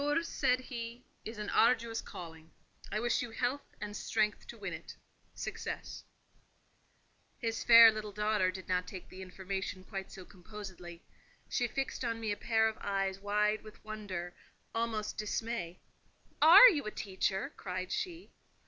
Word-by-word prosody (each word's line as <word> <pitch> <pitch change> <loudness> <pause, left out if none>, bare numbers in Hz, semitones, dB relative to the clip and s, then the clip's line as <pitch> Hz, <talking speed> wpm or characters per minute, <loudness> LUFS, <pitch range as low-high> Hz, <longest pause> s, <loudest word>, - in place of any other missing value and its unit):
"Yours," 295 +4 +1
said 250 0 +2
he, 240 -1 -7 0.2
"is 220 +1 -6
an 210 -1 -4
arduous 230 -1 +3
calling. 160 -2 -10 0.4
I 210 - 0
wish 240 +1 +1
you 245 - -4
health 250 +5 -3
and 210 0 -5
strength 210 -1 -1
to 235 - -9
win 195 -5 -5
in 160 - -5
it—success." - - -8 1.3
His 225 -1 -2
fair 230 -1 +10
little 215 -1 -5
daughter 210 -2 +1
did 185 0 -7
not 180 0 0
take 185 -2 -9
the 190 - -10
information 190 0 -5
quite 195 -1 -6
so 185 - -10
composedly: 180 -3 -10 0.4
she 245 - 0
fixed 270 +2 -3
on 230 -1 -1
me 220 -2 -2
a - - 0
pair 220 0 +2
of 220 - -4
eyes 195 -1 -1
wide 210 +1 +1
with 215 0 -14
wonder—almost 215 +2 -5
with - - -10
dismay. 210 -4 -3 0.6
"Are 355 +10 +11
you 300 - +2
a - - 0
teacher?" 190 -1 -2
cried 185 0 -5
she. 355 - -4
210 Hz, 155 wpm, -33 LUFS, 190-230 Hz, 1.3 s, Are